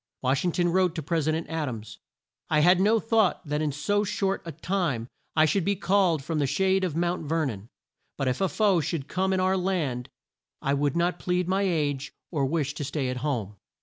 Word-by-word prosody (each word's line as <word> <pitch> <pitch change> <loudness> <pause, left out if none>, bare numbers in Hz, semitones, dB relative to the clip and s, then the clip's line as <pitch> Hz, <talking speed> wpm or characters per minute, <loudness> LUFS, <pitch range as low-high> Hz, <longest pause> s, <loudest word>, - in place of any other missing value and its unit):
Wash 130 +1 +1
ing 180 - +1
ton 175 0 +1
wrote 180 -1 +2
to 160 - -3
Pres 160 0 0
i - - +3
dent 160 +1 -2
Ad 160 -4 -2
ams, 110 -3 -8 0.5
"I 155 -1 +3
had 180 +3 +5
no 220 +3 +4
thought 220 -5 +1
that 150 +1 -1
in 150 -1 0
so 205 +9 0
short 195 -1 -1
a 165 - -5
time 160 -7 -1 0.3
I 155 0 +5
should 185 +4 +1
be 200 +2 +1
called 185 -6 +2
from 155 +1 -2
the 140 - +1
shade 190 +5 +2
of 175 -5 -1
Mount 175 -1 -1
Ver 160 +1 +1
non. 110 -4 -5 0.5
But 135 - -1
if 125 +5 -1
a 190 - +2
foe 200 -3 +3
should 150 -2 -3
come 190 +1 0
in 190 - +1
our 185 +1 +2
land, 165 -10 -1 0.5
I 140 - 0
would 140 +1 +1
not 175 +1 +1
plead 180 -1 0
my 190 +2 +1
age 145 -7 -1 0.2
or 140 -5 0
wish 145 -1 -1
to 150 - -5
stay 135 -1 -2
at 125 - -3
home." 120 -7 -3
165 Hz, 225 wpm, -27 LUFS, 140-185 Hz, 0.5 s, had